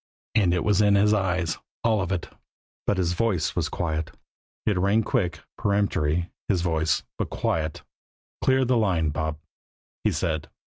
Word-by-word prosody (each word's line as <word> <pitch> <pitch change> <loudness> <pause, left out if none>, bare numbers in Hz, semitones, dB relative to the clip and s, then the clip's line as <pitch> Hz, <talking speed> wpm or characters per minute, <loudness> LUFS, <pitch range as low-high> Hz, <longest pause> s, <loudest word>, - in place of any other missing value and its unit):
And 100 -6 +4
it 90 -1 +1
was 105 -1 +3
in 100 -1 +5
his 105 +1 +4
eyes, 90 -4 0 0.2
all 110 -3 +3
of 95 -1 -2
it. 90 -3 -1 0.6
But 100 - +2
his 90 -2 +1
voice 90 -6 0
was - - 0
quiet. 80 -2 -2 0.6
It 100 -4 +2
rang 100 +4 +3
quick, 85 -5 0 0.2
peremptory, 90 -5 +1 0.2
his 90 -4 +2
voice 80 -3 +1 0.2
but - - -1
quiet. 80 -1 -1 0.6
"Clear 130 0 +4
the 125 0 +3
line, 90 -8 +2
Bob," 80 +1 -2 0.7
he - - +3
said. 80 -2 -1
90 Hz, 155 wpm, -26 LUFS, 80-105 Hz, 0.7 s, in